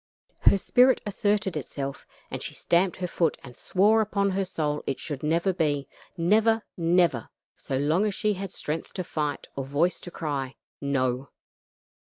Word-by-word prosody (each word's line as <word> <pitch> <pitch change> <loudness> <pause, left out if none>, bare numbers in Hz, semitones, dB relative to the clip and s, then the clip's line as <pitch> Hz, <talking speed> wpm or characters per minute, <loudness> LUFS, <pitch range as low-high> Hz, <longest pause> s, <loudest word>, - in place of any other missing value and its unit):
Her - - +5
spirit 250 +6 +4
asserted 205 -2 0
itself, 140 -1 -5 0.2
and - - -4
she - - -5
stamped 175 +2 +2
her 180 - -2
foot 170 -2 +1
and 125 -2 -11
swore 210 +4 +3
upon 200 -2 +1
her 195 +1 0
soul 150 -4 -2
it 135 - -1
should 145 -4 -5
never 170 +5 +1
be; 145 -5 0 0.3
never! 220 +6 +3
never! 170 -8 +2 0.3
so 135 - -3
long 155 +9 +2
as 200 - -2
she 215 -2 +1
had 195 -1 -5
strength 155 -2 -4
to 185 - -3
fight 150 -3 -3
or 135 - -2
voice 145 +7 +1
to - - -8
cry, 140 -6 -3 0.3
"No." 130 -2 0
170 Hz, 165 wpm, -27 LUFS, 145-195 Hz, 0.3 s, Her